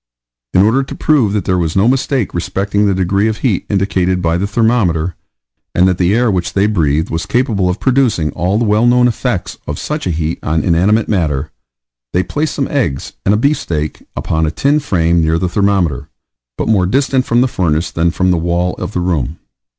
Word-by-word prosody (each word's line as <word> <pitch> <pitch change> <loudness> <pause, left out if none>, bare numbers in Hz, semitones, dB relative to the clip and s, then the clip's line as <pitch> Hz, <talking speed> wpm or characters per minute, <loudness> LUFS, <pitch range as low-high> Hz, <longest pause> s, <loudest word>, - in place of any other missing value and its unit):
In 90 - +6
order 115 +6 +3
to 135 - -6
prove 140 -10 +2
that 105 - -1
there 90 -1 +1
was 80 -2 -1
no 100 +3 +3
mistake 130 -3 0
respecting 95 +4 -1
the 100 - +1
degree 95 +3 +1
of 110 -1 -1
heat 110 -7 -1
indicated 95 -2 0
by 85 -2 0
the 95 +3 -1
thermometer, 100 -7 +1 0.6
and 90 +1 +4
that 90 -1 0
the 90 +3 +2
air 120 -1 +2
which 90 -2 -2
they 100 +1 +2
breathed 80 -7 0
was 80 +1 -3
capable 115 -7 +1
of 90 - -2
producing 125 - +1
all 90 +7 -1
the 115 - +1
well 105 +3 +3
known 125 0 +4
effects 120 - -3
of 75 - -3
such 150 -7 -4
a - - 0
heat 80 0 -2
on 80 0 -1
inanimate 95 +6 +2
matter, 75 -8 -1 0.6
they 90 - +2
placed 150 +5 -2
some 135 - -1
eggs 110 - -2
and 100 - +4
a - - +1
beef 140 +7 +1
steak 75 -3 -4
upon 80 0 -1
a - - +1
tin 140 - +1
frame 85 - +1
near 80 0 +1
the 90 +2 -1
thermometer, 95 -7 0 0.5
but - - -2
more 95 -5 +2
distant 130 +3 +1
from 120 +1 +2
the 130 - +3
furnace 85 -7 -1
than 85 +1 +1
from 90 +2 +1
the 90 - +2
wall 85 +2 0
of - - -5
the - - -1
room. 85 -4 -1
95 Hz, 210 wpm, -15 LUFS, 85-115 Hz, 0.6 s, In